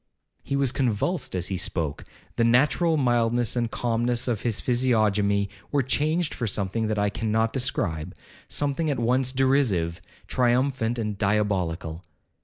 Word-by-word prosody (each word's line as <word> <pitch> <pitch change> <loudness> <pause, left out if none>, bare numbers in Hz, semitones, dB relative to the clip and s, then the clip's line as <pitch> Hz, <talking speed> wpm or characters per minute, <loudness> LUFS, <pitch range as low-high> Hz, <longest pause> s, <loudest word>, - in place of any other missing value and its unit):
He 140 - -3
was 140 -2 +2
convulsed 130 - -1
as 90 -1 -1
he 95 - -2
spoke, 80 -5 -2 0.3
the 115 - +2
natural 150 +7 +3
mildness 120 -3 +1
and 120 -1 0
calmness 120 +1 0
of 115 -5 -1
his 115 -3 0
physiognomy 105 -5 +2 0.2
were 145 -2 +2
changed 155 +5 0
for 120 - -3
something 105 +2 -1
that 110 -1 -1
I 100 0 +1
cannot 110 +1 0
describe—something 130 - -2
at 140 - 0
once 125 +2 +1
derisive, 130 -11 +1 0.3
triumphant, 125 -1 +1
and 105 -3 -3
diabolical. 95 -5 -1
115 Hz, 135 wpm, -25 LUFS, 100-130 Hz, 0.3 s, natural